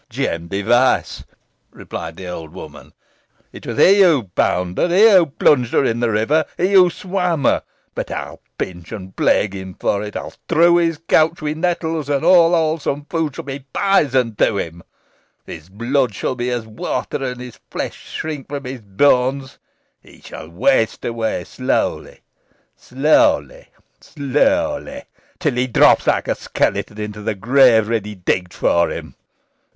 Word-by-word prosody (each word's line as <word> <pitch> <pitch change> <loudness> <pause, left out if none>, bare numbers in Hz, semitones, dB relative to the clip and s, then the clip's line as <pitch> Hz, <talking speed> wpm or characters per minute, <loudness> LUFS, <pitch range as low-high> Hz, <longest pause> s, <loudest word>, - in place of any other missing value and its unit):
"Jem 85 0 -3
Device," 115 +7 +1 0.5
replied 80 0 -8
the 95 - -8
old 80 -3 -7
woman - - -11 0.6
"it - - -11
was - - -4
he 200 +2 +6
who 165 -9 +4
bound 90 0 0
her - - +3
he 200 +6 +5
who 180 -4 +5
plunged 130 -3 +2
her - - +3
in 115 -1 0
the 120 -1 +1
river, 115 +9 +1
he 185 +3 0
who 185 -2 +7
swam 180 -4 -2
her. - - +2 0.3
But - - -5
I - - -5
will - - -16 0.2
pinch 85 -2 -6
and 95 -4 -8
plague 100 -2 +1
him 95 -1 -8
for 100 - 0
it, 105 0 -7
I - - -3
will - - -9
strew 170 +1 +2
his 165 -2 +1
couch 160 +2 +3
with 150 +1 -2
nettles, 160 -3 -2
and 140 -2 0
all 175 -2 +6
wholesome 155 -3 -1
food 160 -4 -2
shall - - -6
be 135 -1 -7
poison 135 - +2
to 100 - +2
him. 85 -2 -5 0.6
His 80 +2 -10
blood 120 +3 -1
shall - - -2
be 125 0 -3
as 120 -2 -3
water, 115 +4 -4
and 125 -1 -4
his 125 -2 -10
flesh - - -6
shrink 150 -4 -5
from 140 -1 -5
his 130 -1 -7
bones. 130 +5 +1 0.4
He - - -19
shall 80 - -10
waste 110 +6 +1
away 115 -6 -2
slowly - - -2 0.5
slowly 285 - +1 0.3
slowly 280 - -1 0.3
till 150 -6 -1
he 125 +1 0
drops 120 - +4
like - - +1
a - - +1
skeleton 100 +2 -2
into 105 0 -6
the 110 0 -2
grave 115 +1 +4
ready 105 -2 -3
digged 90 -1 -2
for 85 0 +2
him. - - -7
130 Hz, 165 wpm, -19 LUFS, 105-160 Hz, 0.6 s, who